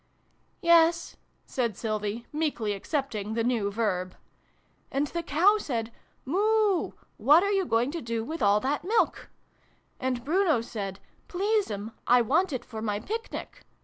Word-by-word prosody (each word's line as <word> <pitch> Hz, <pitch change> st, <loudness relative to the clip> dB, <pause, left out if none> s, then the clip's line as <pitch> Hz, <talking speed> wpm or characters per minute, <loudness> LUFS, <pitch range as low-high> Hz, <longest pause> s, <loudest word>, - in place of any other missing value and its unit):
" -, -, -41 dB
Yes," 335 Hz, 0 st, +4 dB, 0.3 s
said 235 Hz, -6 st, -2 dB
Sylvie, 215 Hz, +1 st, -3 dB
meekly 290 Hz, -9 st, -1 dB
accepting 220 Hz, -2 st, -3 dB
the 230 Hz, -, +1 dB
new 230 Hz, -4 st, +1 dB
verb. 195 Hz, -4 st, -1 dB, 0.4 s
" -, -, -40 dB
And 275 Hz, +2 st, +1 dB
the 340 Hz, +4 st, -3 dB
Cow 385 Hz, +7 st, +3 dB
said 235 Hz, -, -3 dB, 0.2 s
' -, -, -40 dB
Moo! 410 Hz, +4 st, +2 dB, 0.2 s
What 295 Hz, -, +6 dB
are 400 Hz, -, +1 dB
you 390 Hz, -2 st, +1 dB
going 235 Hz, 0 st, +1 dB
to 335 Hz, +1 st, -4 dB
do 230 Hz, -1 st, -2 dB
with 320 Hz, +7 st, -5 dB
all 205 Hz, +1 st, +4 dB
that 285 Hz, +3 st, -1 dB
Milk? 430 Hz, +6 st, 0 dB, 0.4 s
' -, -, -36 dB, 0.3 s
And 255 Hz, -2 st, -2 dB
Bruno 330 Hz, -3 st, +3 dB
said 200 Hz, -4 st, -5 dB
' -, -, -36 dB
Please'm, 365 Hz, -, -1 dB, 0.2 s
I 245 Hz, +1 st, +6 dB
want 330 Hz, -, +2 dB
it 255 Hz, -, -4 dB
for 220 Hz, -2 st, -7 dB
my 210 Hz, -2 st, -1 dB
Picnic.' 450 Hz, -, -6 dB
260 Hz, 165 wpm, -27 LUFS, 220-340 Hz, 0.4 s, What